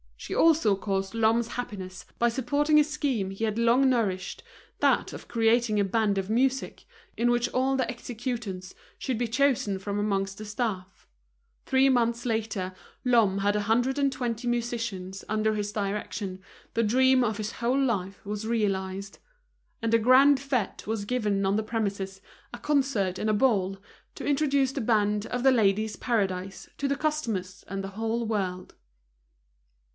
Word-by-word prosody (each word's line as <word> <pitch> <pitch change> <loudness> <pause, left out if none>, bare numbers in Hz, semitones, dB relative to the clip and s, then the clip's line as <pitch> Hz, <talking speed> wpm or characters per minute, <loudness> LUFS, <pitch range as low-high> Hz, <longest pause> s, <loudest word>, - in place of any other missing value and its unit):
She - - -6
also 315 -11 +4
caused 195 0 -2
Lhomme's 230 +1 +2
happiness 190 -7 -6
by 235 - +3
supporting 285 +5 +2
a - - +6
scheme 275 -9 -1
he 195 +3 -6
had 220 0 0
long 240 +3 +4
nourished, 195 -7 -1 0.4
that - - +2
of - - -9
creating 230 -1 +2
a - - +4
band 205 0 +1
of 195 0 -2
music, 260 +4 0 0.3
in 240 +1 +2
which 240 0 +2
all 265 +1 +1
the 260 -3 0
executants 230 -6 -5 0.2
should 260 -4 -2
be 240 +1 -1
chosen 235 -5 +1
from 200 +1 -3
amongst 195 -2 -1
the 215 - -6
staff. 205 -4 -4 0.6
Three 265 +1 +4
months 235 -2 +1
later 215 -5 -2 0.3
Lhomme 225 -6 +3
had 205 +1 +1
a 210 - +1
hundred 245 +6 +1
and 280 -1 +2
twenty 240 -2 -3
musicians 230 -6 -3
under 215 0 +1
his 205 -1 -2
direction, 200 -2 -3 0.4
the 230 - +2
dream 260 +3 +4
of 220 -3 -1
his 215 +1 -4
whole 245 +3 0
life 200 -8 -1
was 210 +1 -4
realized. 195 -3 -2 0.6
And 230 0 0
a 230 - +6
grand 265 +5 +6
fête 265 -9 -2
was 220 -2 -2
given 210 -4 0
on 195 +2 +2
the 220 - 0
premises, 200 -3 -3 0.3
a - - -5
concert 260 -11 0
and 215 - 0
a - - +3
ball, 205 -5 +2 0.4
to - - -7
introduce 280 -2 +2
the 270 - -3
band 210 -2 +1
of 245 0 -3
The 265 - +6
Ladies' 215 -2 +2
Paradise 195 -5 -2
to 280 - -1
the 280 - +1
customers 230 -12 -2
and 195 +1 -4
the 195 - -5
whole 225 +1 -1
world. 190 -4 -3
225 Hz, 165 wpm, -27 LUFS, 200-250 Hz, 0.6 s, a